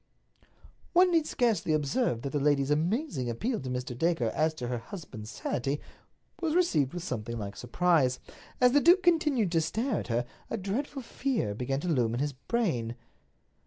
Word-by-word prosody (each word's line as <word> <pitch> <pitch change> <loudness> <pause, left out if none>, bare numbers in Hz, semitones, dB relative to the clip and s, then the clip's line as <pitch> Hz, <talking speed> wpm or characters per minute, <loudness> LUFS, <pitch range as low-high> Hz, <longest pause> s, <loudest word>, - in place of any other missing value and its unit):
One 360 +1 +6
need 325 -3 +3
scarcely 215 -10 +1
observe 150 - 0
that 140 - -3
the 145 - 0
lady's 140 -1 +2
amazing 165 - 0
appeal 225 - -1
to 130 - -6
Mr. 125 0 -3
Dacre 150 -5 +1
as 155 +1 +1
to 125 -5 -4
her 120 -1 -2
husband's 115 - -9
sanity 135 +6 -2 0.6
was 325 -2 0
received 165 - +2
with 175 - -4
something 115 -7 -4
like 100 -2 -5
surprise. 135 -1 +2 0.4
As 250 0 +6
the 290 +2 +4
duke 360 +4 +6
continued 300 - +3
to 165 -1 +3
stare 225 - -1
at - - -6
her, 120 +1 0 0.2
a 230 - -2
dreadful 250 +8 -3
fear 240 - -1
began 130 +5 -2
to 180 - -4
loom 120 -8 +1
in - - -2
his 145 +1 -1
brain. 130 - -1
155 Hz, 175 wpm, -29 LUFS, -, 0.6 s, One